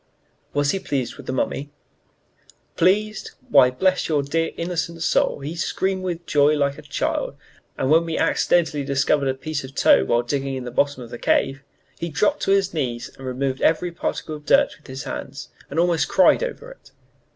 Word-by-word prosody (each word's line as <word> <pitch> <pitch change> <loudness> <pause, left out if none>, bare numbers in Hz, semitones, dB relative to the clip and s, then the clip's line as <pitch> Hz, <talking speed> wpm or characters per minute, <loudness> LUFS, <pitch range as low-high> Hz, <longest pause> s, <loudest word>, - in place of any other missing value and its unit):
"Was 145 0 +1
he 195 - -1
pleased 135 -9 -3
with - - -12
the - - -1
mummy?" 135 +2 -2 1.1
"Pleased? 210 +4 +1 0.2
Why, 135 -3 +6
bless 185 +10 +1
your 150 -3 +2
dear, 165 +4 0
innocent 170 -1 -3
soul, 145 - +1
he 150 +4 -5
screamed 190 +3 -1
with 175 -2 -4
joy 145 +1 +3
like 140 -1 0
a - - -9
child, - - -2 0.4
when 155 +5 +3
we 165 -1 -3
accidentally 160 -4 +2
discovered 140 +1 +1
a 130 - 0
piece 150 +2 -4
of 130 - -8
a - - -18
toe 65 - +5
while 120 - +1
digging 135 +2 -2
in 130 - -5
the 125 - -6
bottom 140 +1 0
of 115 - -12
the 120 - -7
cave! 135 0 +1 0.4
He 170 - -3
dropped 210 - 0
on 195 - +5
his 195 -2 0
knees 125 -7 -3
and 135 - -9
removed 130 +1 -2
every 170 +2 +2
particle 165 -2 -4
of 150 -1 -12
dirt 280 0 +4
with - - -21
his 130 +1 -6
hands, 140 +2 -7 0.2
and 155 - -2
almost 170 -1 +2
cried - - +5
over - - -5
it. - - -17
150 Hz, 195 wpm, -22 LUFS, 135-170 Hz, 1.1 s, Why